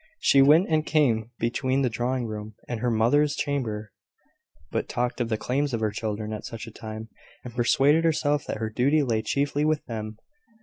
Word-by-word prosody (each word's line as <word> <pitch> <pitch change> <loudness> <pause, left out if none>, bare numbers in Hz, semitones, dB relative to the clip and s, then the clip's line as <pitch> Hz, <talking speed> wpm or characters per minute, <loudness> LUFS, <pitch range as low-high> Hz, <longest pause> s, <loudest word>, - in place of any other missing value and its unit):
She 135 - +5
went 155 +7 +6
and 155 -1 +2
came 120 -9 +2
between 130 +3 0
the - - +3
drawing 120 +2 -1
room 105 -1 -6
and 120 -2 -3
her 120 +2 0
mother's 125 +7 +3
chamber, 110 -7 -2 0.8
but - - -2
talked 125 +1 -1
of 115 - -1
the 110 - 0
claims 135 +3 -1
of - - -2
her 110 -1 0
children 105 0 -4
at 105 - -6
such 115 -2 -7
a 115 - -10
time, 110 +1 -8 0.3
and 125 - -8
persuaded 135 +6 +3
herself 150 -3 +1
that - - -3
her 110 0 -3
duty 140 +7 +2
lay 115 -4 0
chiefly 140 +4 0
with 155 -1 +1
them. 110 -2 -6
120 Hz, 190 wpm, -26 LUFS, 110-145 Hz, 0.8 s, went